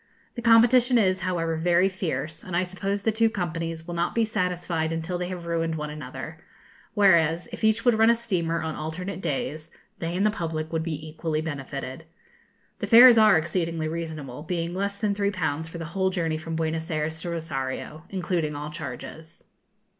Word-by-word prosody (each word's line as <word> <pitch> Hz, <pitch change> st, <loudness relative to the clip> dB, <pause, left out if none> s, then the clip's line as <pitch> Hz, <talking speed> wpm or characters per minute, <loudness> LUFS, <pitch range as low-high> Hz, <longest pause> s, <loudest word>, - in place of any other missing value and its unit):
The 235 Hz, -, -6 dB
competition 240 Hz, +2 st, +6 dB
is, 185 Hz, -4 st, +3 dB
however, 170 Hz, -3 st, -1 dB
very 175 Hz, +3 st, +3 dB
fierce, 170 Hz, -4 st, -4 dB
and 175 Hz, -2 st, -3 dB
I 180 Hz, -, +2 dB
suppose 195 Hz, +2 st, -3 dB
the 225 Hz, -, +2 dB
two 225 Hz, +1 st, +3 dB
companies 165 Hz, -5 st, -3 dB
will 175 Hz, -, -6 dB
not 170 Hz, 0 st, -1 dB
be 230 Hz, -1 st, +3 dB
satisfied 180 Hz, -6 st, -1 dB
until 165 Hz, +2 st, -3 dB
they 180 Hz, -, -2 dB
have 180 Hz, -2 st, -6 dB
ruined 165 Hz, -1 st, -1 dB
one 150 Hz, -1 st, -4 dB
another; 150 Hz, 0 st, -7 dB, 0.6 s
whereas, 170 Hz, -4 st, +4 dB
if 230 Hz, -, -8 dB
each 220 Hz, +2 st, +2 dB
would 245 Hz, -, +6 dB
run 225 Hz, +1 st, +6 dB
a 235 Hz, -, +5 dB
steamer 170 Hz, -8 st, -1 dB
on 160 Hz, -1 st, -2 dB
alternate 180 Hz, +6 st, -5 dB
days, 155 Hz, +1 st, -3 dB, 0.3 s
they 170 Hz, +1 st, -2 dB
and 200 Hz, -, +2 dB
the 215 Hz, -, +4 dB
public 160 Hz, -5 st, -4 dB
would 160 Hz, -, +1 dB
be 160 Hz, -1 st, -4 dB
equally 155 Hz, 0 st, -2 dB
benefited. 140 Hz, -1 st, -5 dB, 0.7 s
The -, -, -3 dB
fares 240 Hz, 0 st, +9 dB
are 215 Hz, -5 st, +7 dB
exceedingly 165 Hz, 0 st, -1 dB
reasonable, 155 Hz, -5 st, -5 dB
being 170 Hz, +1 st, -3 dB
less 200 Hz, +2 st, -2 dB
than 210 Hz, -1 st, 0 dB
3_l_. 180 Hz, -7 st, -1 dB
for 170 Hz, -, -8 dB
the 165 Hz, -, -5 dB
whole 190 Hz, +3 st, 0 dB
journey 165 Hz, -4 st, -1 dB
from 165 Hz, +1 st, -5 dB
Buenos 160 Hz, +1 st, -2 dB
Ayres 160 Hz, 0 st, -2 dB
to 175 Hz, -, -4 dB
Rosario, 155 Hz, -1 st, -4 dB
including 175 Hz, -5 st, -1 dB
all 150 Hz, +1 st, -5 dB
charges. 155 Hz, +2 st, -8 dB
170 Hz, 185 wpm, -26 LUFS, 160-190 Hz, 0.7 s, fares